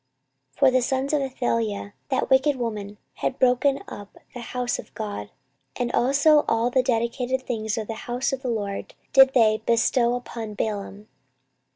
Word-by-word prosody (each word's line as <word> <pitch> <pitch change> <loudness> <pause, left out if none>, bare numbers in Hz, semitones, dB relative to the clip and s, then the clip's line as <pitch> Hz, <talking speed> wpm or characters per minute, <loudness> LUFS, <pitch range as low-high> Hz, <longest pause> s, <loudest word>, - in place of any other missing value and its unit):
14:024:007 - - -26
For - - +6
the 255 0 +3
sons 265 +3 -1
of 295 - +2
Athaliah, 230 -6 -2 0.2
that 265 - -1
wicked 270 +2 +4
woman, 210 -4 -4 0.2
had 260 - -2
broken 260 +2 +2
up 205 -1 -10 0.2
the 245 - -7
house 245 0 -3
of - - -10
God; 205 - -5 0.5
and 245 -1 -2
also 285 +5 +4
all 230 +2 +1
the 260 - +3
dedicated 250 +1 -1
things 220 -4 -3
of 220 - -2
the 225 - -5 0.2
house 250 +3 -1
of 265 - -3
the 260 - -3
LORD 205 -4 -4 0.2
did 270 0 +7
they 220 -3 +4
bestow 235 +1 +2
upon 230 -3 -6
Baalim. 205 -1 -4
245 Hz, 170 wpm, -24 LUFS, 220-260 Hz, 0.5 s, did